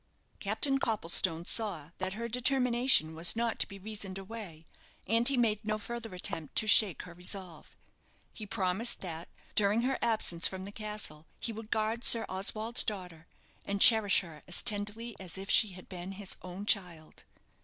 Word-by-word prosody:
Captain 270 Hz, +7 st, -1 dB
Copplestone 170 Hz, -6 st, 0 dB
saw 175 Hz, -10 st, +2 dB
that 185 Hz, 0 st, -4 dB
her 230 Hz, +3 st, -5 dB
determination 250 Hz, -, +2 dB
was 165 Hz, +5 st, +3 dB
not 230 Hz, 0 st, -2 dB
to -, -, 0 dB
be 195 Hz, -, -11 dB
reasoned 200 Hz, -1 st, -7 dB
away, 195 Hz, -5 st, -10 dB, 0.4 s
and 230 Hz, +4 st, +3 dB
he 275 Hz, -2 st, +3 dB
made 220 Hz, -3 st, 0 dB
no 215 Hz, 0 st, -2 dB
further 225 Hz, -1 st, -8 dB
attempt 170 Hz, -5 st, -3 dB
to -, -, +3 dB
shake 210 Hz, -3 st, +5 dB
her 175 Hz, -, -12 dB
resolve. 180 Hz, -1 st, -7 dB, 0.6 s
He 215 Hz, -, -9 dB
promised 195 Hz, +3 st, +1 dB
that, 165 Hz, -3 st, -8 dB, 0.2 s
during 210 Hz, +3 st, +2 dB
her 265 Hz, +1 st, -1 dB
absence 200 Hz, -7 st, +2 dB
from 190 Hz, 0 st, -7 dB
the 200 Hz, -, -9 dB
castle, 210 Hz, -8 st, -5 dB
he 230 Hz, -, -5 dB
would 220 Hz, 0 st, -10 dB
guard 220 Hz, +2 st, -2 dB
Sir 230 Hz, -1 st, +7 dB
Oswald's 215 Hz, +5 st, +1 dB
daughter, 180 Hz, -6 st, -6 dB, 0.4 s
and 200 Hz, 0 st, -4 dB
cherish 220 Hz, -2 st, +5 dB
her 160 Hz, -5 st, -13 dB
as 180 Hz, -, +1 dB
tenderly 215 Hz, +1 st, -1 dB
as 185 Hz, -1 st, -8 dB
if 195 Hz, +1 st, -6 dB
she 210 Hz, -4 st, +5 dB
had 185 Hz, 0 st, -14 dB
been 185 Hz, +1 st, -8 dB
his 195 Hz, -1 st, -5 dB
own 185 Hz, +3 st, -9 dB
child. 175 Hz, -7 st, -2 dB
205 Hz, 170 wpm, -30 LUFS, 180-225 Hz, 0.6 s, Sir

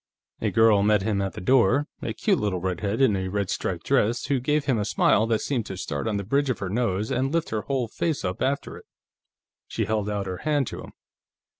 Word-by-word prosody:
A -, -, +1 dB
girl 110 Hz, -3 st, +4 dB
met 105 Hz, -1 st, +3 dB
him 100 Hz, -2 st, 0 dB
at 95 Hz, -3 st, -2 dB
the -, -, -7 dB
door, 130 Hz, +5 st, +3 dB, 0.2 s
a 115 Hz, -, -3 dB
cute 110 Hz, -, +1 dB
little 100 Hz, -4 st, -1 dB
redhead 95 Hz, +5 st, -2 dB
in 110 Hz, -7 st, +4 dB
a 95 Hz, -1 st, -2 dB
red 100 Hz, 0 st, -2 dB
striped -, -, -3 dB
dress, 115 Hz, +3 st, +1 dB
who 140 Hz, -2 st, +1 dB
gave 150 Hz, +3 st, 0 dB
him 125 Hz, -5 st, +1 dB
a -, -, 0 dB
smile 110 Hz, +1 st, +2 dB
that 110 Hz, -1 st, +1 dB
seemed 125 Hz, -6 st, -2 dB
to 95 Hz, -, -6 dB
start 70 Hz, -5 st, -3 dB
on 105 Hz, -2 st, 0 dB
the 100 Hz, -, -3 dB
bridge 140 Hz, +7 st, +1 dB
of 125 Hz, -, 0 dB
her 95 Hz, -, -4 dB
nose 110 Hz, -1 st, -1 dB
and 130 Hz, +1 st, 0 dB
lift 165 Hz, 0 st, -1 dB
her 110 Hz, -1 st, -1 dB
whole 130 Hz, -2 st, -1 dB
face 150 Hz, +2 st, -2 dB
up 90 Hz, 0 st, -3 dB
after 140 Hz, +1 st, -1 dB
it. -, -, -14 dB, 0.8 s
She -, -, -2 dB
held 105 Hz, -2 st, -1 dB
out 100 Hz, -1 st, -2 dB
her 90 Hz, -1 st, -4 dB
hand 145 Hz, +1 st, 0 dB
to -, -, -7 dB
him. -, -, -11 dB
110 Hz, 240 wpm, -25 LUFS, 100-130 Hz, 0.8 s, girl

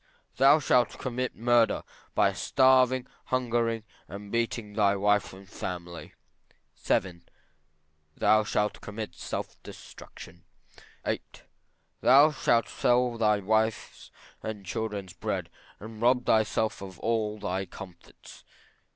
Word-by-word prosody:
Thou 135 Hz, +3 st, +6 dB
shalt 125 Hz, -4 st, +2 dB
commit 130 Hz, 0 st, -3 dB
murder, 120 Hz, 0 st, +2 dB, 0.3 s
by -, -, +3 dB
starving, 130 Hz, -1 st, +3 dB, 0.2 s
hungering, 120 Hz, -3 st, 0 dB, 0.2 s
and 100 Hz, +1 st, -9 dB
beating 115 Hz, -2 st, -2 dB
thy 100 Hz, -2 st, +3 dB
wife 105 Hz, +1 st, +1 dB
and 95 Hz, +1 st, -13 dB
family. 90 Hz, -3 st, -7 dB, 0.6 s
VII. 90 Hz, -3 st, -1 dB, 1.0 s
Thou 110 Hz, 0 st, +4 dB
shalt 105 Hz, 0 st, -1 dB
commit 105 Hz, +1 st, -6 dB
self -, -, -6 dB
destruction. -, -, -13 dB, 0.6 s
VIII. -, -, -1 dB, 0.8 s
Thou 140 Hz, +4 st, +6 dB
shalt 115 Hz, -5 st, +1 dB
sell 125 Hz, 0 st, +1 dB
thy 105 Hz, -2 st, +2 dB
wife's 110 Hz, +2 st, -1 dB, 0.3 s
and 105 Hz, -3 st, -6 dB
children's 100 Hz, -2 st, -4 dB
bread -, -, -4 dB, 0.3 s
and 110 Hz, +1 st, -10 dB
rob 125 Hz, +1 st, +3 dB
thyself 110 Hz, -1 st, +1 dB
of 95 Hz, -3 st, -9 dB
all 110 Hz, -2 st, -1 dB
thy 95 Hz, -1 st, -3 dB
comforts. 90 Hz, -3 st, -13 dB
110 Hz, 110 wpm, -28 LUFS, 100-120 Hz, 1.0 s, Thou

